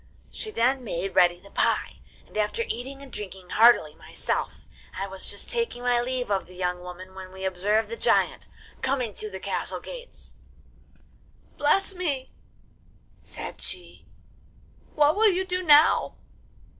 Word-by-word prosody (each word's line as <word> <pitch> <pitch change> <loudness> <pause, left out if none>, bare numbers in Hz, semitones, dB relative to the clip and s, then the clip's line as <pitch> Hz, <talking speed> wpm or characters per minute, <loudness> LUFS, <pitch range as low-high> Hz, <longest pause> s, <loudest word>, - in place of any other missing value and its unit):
She 435 - -4
then 260 - +1
made 195 -3 -3
ready 175 -1 +5
the 200 +2 -16
pie, - - 0 0.3
and - - -20
after 215 - 0
eating 270 +4 -5
and 270 - -12
drinking 190 -3 -7
heartily 225 -9 +6
myself, - - -4 0.3
I 195 - -2
was 190 -1 -5
just 205 - -5
taking 465 - -2
my 245 -1 +3
leave 250 -2 -2
of 195 -3 0
the 180 - -14
young 180 -1 -1
woman 180 +1 -9
when 190 -1 -9
we 190 0 -6
observed 200 +4 +1
the 465 - -5
giant - - +2 0.3
coming 260 -5 0
through 215 - -6
the 190 -1 -7
castle - - -3
gates. - - -10 1.2
'"Bless 390 +7 +2
me," 300 -8 -2 0.9
said - - -8
she, 365 -3 -6 0.9
"what 300 +1 +5
will 435 +1 +6
you 375 0 0
do 365 -1 -1
now? 305 -2 +5
240 Hz, 150 wpm, -26 LUFS, 190-300 Hz, 1.2 s, heartily